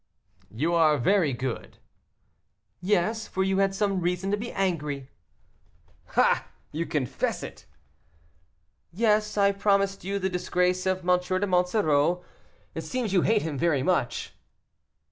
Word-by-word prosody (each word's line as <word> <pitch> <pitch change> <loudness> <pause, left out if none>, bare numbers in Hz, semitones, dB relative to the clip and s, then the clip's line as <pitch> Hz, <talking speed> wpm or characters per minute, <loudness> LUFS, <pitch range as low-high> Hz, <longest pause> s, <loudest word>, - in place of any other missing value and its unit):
"You 155 +10 -1
are 155 -3 +4
very 170 +3 +2
good." 125 0 -5 1.0
"Yes, 210 +4 0
for 190 - -1
you 190 0 +1
had 195 0 +2
some 200 -2 0
reason 180 +3 -1
to - - +3
be 235 +3 -5
angry." 150 -8 -2 1.1
"Ah! - - +3 0.2
you 165 +3 -3
confess 140 -5 -2
it." - - -10 1.2
"Yes, 210 +2 +1
I 200 0 +4
promised 200 -1 +1
you 200 +2 -2
the 190 -1 -1
disgrace 180 0 0
of 185 -1 -1
M. 180 0 +4
de 185 +2 -1
Monsoreau. 180 -3 +2 0.5
It - - -4
seems 245 -6 -3
you 185 - +4
hate 215 +2 +2
him 150 -4 -3
very 155 -6 +2
much." 140 -8 -1
185 Hz, 135 wpm, -26 LUFS, 165-200 Hz, 1.2 s, are